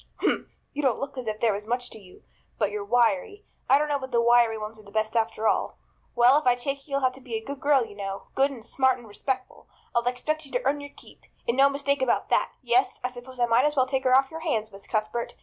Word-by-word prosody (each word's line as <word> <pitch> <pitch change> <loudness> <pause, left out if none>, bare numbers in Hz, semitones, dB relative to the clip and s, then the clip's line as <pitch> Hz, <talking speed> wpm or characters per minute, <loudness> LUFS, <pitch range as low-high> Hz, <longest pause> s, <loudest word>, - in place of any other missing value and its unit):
"Humph! - - -1 0.2
You 295 - -2
don't 260 -5 +2
look 275 - -5
as 255 -3 -6
if 215 0 -3
there 225 -3 +3
was 205 +2 -6
much 245 +1 -2
to 220 - -8
you. 185 -2 -17 0.3
But 210 -2 0
you're 210 0 -3
wiry. 275 - +1 0.2
I 275 - +7
don't 300 +1 0
know 290 -1 0
but 260 -1 -6
the 240 -2 +2
wiry 235 -1 +4
ones 215 +1 -7
are - - -14
the 200 - -15
best 220 +1 -1
after 225 -1 +1
all. - - 0 0.4
Well, 250 +4 +6
if 305 - -5
I 245 - +6
take 275 +3 -4
you 280 - -9
you'll 275 - +1
have 255 -1 +3
to 265 - -11
be 245 -3 -6
a 220 - -4
good 280 0 -6
girl, 280 -4 +3
you 215 - -12
know 195 -1 -5
good 270 +1 +3
and 250 -6 -9
smart 260 -1 +2
and 240 -2 -13
respectful. 255 +5 -4 0.3
I'll 235 - +4
expect 305 +6 -1
you - - -16
to - - -1
earn 290 +1 +1
your 285 - -8
keep, - - -16 0.3
and 235 - +1
no 275 +1 +6
mistake 280 0 0
about 260 - +1
that. - - +2
Yes, 245 +2 +2
I 250 - -1
suppose 250 +1 -11
I 240 - +4
might 235 +2 +3
as 300 0 +1
well 260 -2 +4
take 265 0 -2
her 255 0 +5
off 270 0 +3
your 320 - -6
hands, 225 -10 -1
Miss 195 0 -12
Cuthbert. 215 +1 -2
250 Hz, 275 wpm, -26 LUFS, 225-275 Hz, 0.4 s, I